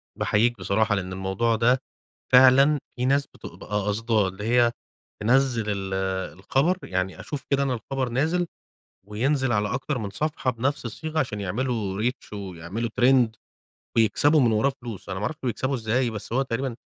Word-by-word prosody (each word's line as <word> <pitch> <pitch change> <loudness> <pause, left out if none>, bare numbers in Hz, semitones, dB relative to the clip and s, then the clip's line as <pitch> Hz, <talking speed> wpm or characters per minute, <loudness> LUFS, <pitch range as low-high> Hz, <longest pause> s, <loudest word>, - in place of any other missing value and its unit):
باحيِّيك 120 +3 +1
بصراحة، 105 +3 +1
لإن 95 -1 -4
الموضوع 95 +5 0
ده 125 +4 +3 0.5
فعلًا 135 +3 +7 0.2
في 125 0 -1
ناس 140 +1 +2
بتبقى - - -12
أ 105 -1 0
قصداه، 110 -1 +1
اللي 95 +2 -7
هي 120 +1 +3 0.5
تنزل 125 0 +3
ال 95 -1 -3 0.4
الخبر 140 - +1
يعني 95 0 -3
أشوف 145 -2 -5
كده 140 0 +2
أنا 130 -2 0
الخبر 130 +3 -3
نازل، 160 +9 0 0.6
وينزل 130 +5 0
على 105 0 0
أكتر 135 +3 -2
من 105 -4 -4
صفحة 145 +4 -1
بنفس 125 +2 -2
الصِّيغة، 155 +7 -3
عشان 110 -7 -2
يعملوا 105 -1 -2
Reach 125 -2 -3
ويعملوا 100 +3 -5
Trend 125 -2 +5 0.7
ويكسبوا 145 +8 +4
من 120 -4 +3
وراه 120 +6 +2
فلوس، 115 -5 -8
أنا 95 - -3
ما 105 - -3
أعرفش 155 - -3
بيكسبوا 130 +3 -1
إزَّاي، 120 +1 0
بس 110 0 -7
هو 135 +3 +2
تقريبًا 130 -1 -3
120 Hz, 165 wpm, -25 LUFS, 105-135 Hz, 0.7 s, فعلًا